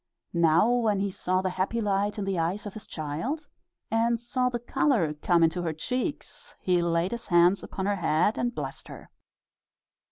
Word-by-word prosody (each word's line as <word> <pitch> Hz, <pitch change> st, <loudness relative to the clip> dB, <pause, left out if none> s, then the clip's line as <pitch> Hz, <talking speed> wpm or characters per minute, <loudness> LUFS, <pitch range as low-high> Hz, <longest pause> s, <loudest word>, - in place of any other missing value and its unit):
Now, 170 Hz, +3 st, +4 dB
when 230 Hz, -4 st, +2 dB
he 200 Hz, 0 st, -1 dB
saw 185 Hz, 0 st, -1 dB
the 185 Hz, -, 0 dB
happy 190 Hz, +6 st, -1 dB
light 205 Hz, -1 st, 0 dB
in 205 Hz, -, -2 dB
the 195 Hz, -3 st, -1 dB
eyes 175 Hz, +6 st, -1 dB
of 205 Hz, -, -6 dB
his 215 Hz, -, -9 dB
child, 170 Hz, -, -4 dB, 0.4 s
and 230 Hz, +1 st, +2 dB
saw 250 Hz, +2 st, 0 dB
the 245 Hz, -, -2 dB
color 240 Hz, -, +1 dB
come 170 Hz, +3 st, +2 dB
into 165 Hz, +2 st, +2 dB
her 165 Hz, -2 st, -2 dB
cheeks, 250 Hz, -, -4 dB
he 180 Hz, -2 st, +2 dB
laid 170 Hz, +1 st, +1 dB
his 235 Hz, 0 st, -4 dB
hands 175 Hz, +2 st, +4 dB
upon 190 Hz, -, -5 dB
her 205 Hz, 0 st, +1 dB
head 165 Hz, +4 st, +1 dB
and 240 Hz, 0 st, -1 dB
blessed -, -, -5 dB
her. -, -, -11 dB
195 Hz, 185 wpm, -27 LUFS, 170-235 Hz, 0.4 s, Now